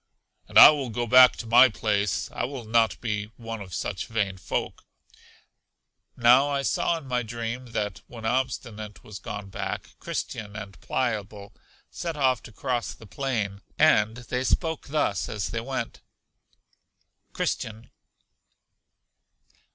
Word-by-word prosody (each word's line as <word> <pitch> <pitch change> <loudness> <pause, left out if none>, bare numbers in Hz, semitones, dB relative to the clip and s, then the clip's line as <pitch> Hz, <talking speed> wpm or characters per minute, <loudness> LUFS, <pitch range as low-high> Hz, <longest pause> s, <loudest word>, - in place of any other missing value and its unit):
And - - -1
I - - +12
will 140 -4 -3
go 120 +2 -2
back 125 +2 +8
to - - -7
my 120 +3 +7
place; 105 -3 -1
I - - -3
will 130 -2 -6
not 115 -3 +2
be 105 -3 -2
one 115 -2 -6
of 95 -2 -9
such - - -3
vain 105 -4 -1
folk. - - -3 1.3
Now 125 +4 +6
I 140 -1 -1
saw 170 - +1
in 160 - -10
my 125 -2 0
dream, 120 +2 -5
that 105 -5 -2
when 115 -2 -9
Obstinate 110 -3 -3
was 105 -1 -9
gone 100 -2 -7
back, - - -5
Christian 105 -1 -5
and 100 -5 -8
Pliable 105 -5 -3 0.4
set 165 -3 -4
off 130 -4 +2
to - - -16
cross 120 +3 -3
the 110 - -14
plain, 105 -5 -3 0.2
and 110 +2 +4
they 125 +1 -3
spoke 160 +3 -1
thus 140 - 0
as 105 -2 -3
they 115 - -2
went: 130 -1 -4 1.3
Christian. 110 +1 -3
115 Hz, 140 wpm, -26 LUFS, 105-130 Hz, 1.3 s, I